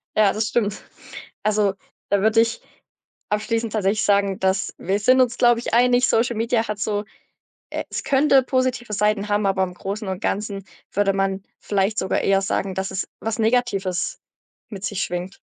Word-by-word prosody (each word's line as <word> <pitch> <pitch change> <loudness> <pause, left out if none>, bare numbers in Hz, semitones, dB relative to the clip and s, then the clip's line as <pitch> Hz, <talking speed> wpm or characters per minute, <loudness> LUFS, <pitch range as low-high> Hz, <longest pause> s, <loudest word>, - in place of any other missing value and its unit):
Ja, 215 -2 +5
das 215 +2 -1
stimmt. 210 -4 -1 0.6
Also, 210 -2 +2 0.4
da 200 -1 +2
würde 220 +2 +3
ich 230 0 -1 0.7
abschließend 225 +1 -1
tatsächlich 210 0 +1
sagen, 200 -1 +2
dass 190 0 0
wir 195 +3 -1
sind 255 +5 +4
uns, 245 -1 +1
glaube 240 -1 +4
ich, 235 - -5
einig, 245 +1 +4
Social 235 +1 +2
Media 225 +1 0
hat 210 - -3
so 205 0 -1 0.7
e - - -3
es - - -4
könnte 275 0 +4
positive 255 -3 -1
Seiten 210 0 +1
haben, 205 0 +1
aber 190 -1 +2
im 180 -1 -3
Großen 200 +3 -5
und 190 +1 -4
Ganzen 200 -2 -2 0.3
würde 200 0 +2
man 195 0 -1 0.2
vielleicht 205 +2 0
sogar 190 - 0
eher 195 0 +3
sagen, 190 0 -1
dass 190 +1 -2
es 190 +1 -3
was 225 0 -3
Negatives 225 - 0 0.5
mit 200 -3 -6
sich 205 0 -2
schwingt. 180 +2 -5
210 Hz, 175 wpm, -22 LUFS, 195-230 Hz, 0.7 s, Ja